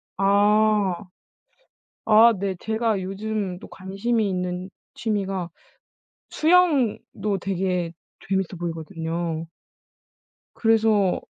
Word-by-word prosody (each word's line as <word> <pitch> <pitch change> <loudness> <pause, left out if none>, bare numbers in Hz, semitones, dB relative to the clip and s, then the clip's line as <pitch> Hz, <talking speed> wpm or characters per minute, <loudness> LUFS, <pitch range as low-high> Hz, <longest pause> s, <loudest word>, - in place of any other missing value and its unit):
아. 205 -1 +3 1.0
아 225 +2 +7
네 195 -1 -2
제가 220 -2 0
요즘 195 -1 -3
또 - - -11
관심이 200 +3 -1
있는 180 0 -3 0.3
취미가 195 -5 -2 0.8
수영도 295 - +2
되게 180 -2 -1 0.4
재미있어 190 -1 -1
보이거든요. 165 -1 -4 1.1
그래서 220 -4 +2
195 Hz, 175 characters per minute, -24 LUFS, 180-215 Hz, 1.1 s, 아